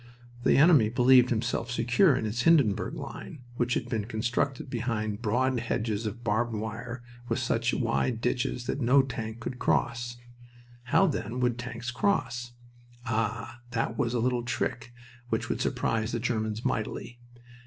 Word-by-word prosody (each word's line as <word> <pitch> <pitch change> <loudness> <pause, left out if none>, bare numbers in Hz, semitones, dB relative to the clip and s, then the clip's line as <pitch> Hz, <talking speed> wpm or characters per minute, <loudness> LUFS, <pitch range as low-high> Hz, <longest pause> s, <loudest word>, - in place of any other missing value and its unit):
The - - +4
enemy 145 -7 +6
believed 125 +1 +5
himself 120 0 -1
secure 120 +7 +3
in 125 - -1
his 110 +2 -1
Hindenburg 140 -10 +3
line, 140 - -8
which 120 0 +1
had 115 - -2
been 110 -4 -2
constructed 120 +5 -1
behind 115 -4 -2
broad 125 +3 +1
hedges 110 -1 -2
of 115 +3 -6
barbed 115 +1 0
wire 115 +3 -5 0.3
with - - +1
such 120 -1 0
wide 120 -1 0
ditches 125 0 -1
that 140 - -2
no 130 +3 +5
tank 115 -3 -5
could 125 +1 -5
cross. 120 0 0 0.7
How, 160 +10 +4
then, 125 - -2
would 120 -1 +1
tanks 120 -1 -5
cross? 120 -6 -1 0.5
Ah, 115 +1 -2
that 115 -1 -1
was 120 +1 0
a - - +1
little 125 +1 +1
trick 120 0 -3 0.4
which - - -1
would - - -1
surprise 110 0 0
the 120 - 0
Germans 110 -2 -2
mightily. 115 +2 -3
120 Hz, 155 wpm, -28 LUFS, 115-125 Hz, 0.7 s, enemy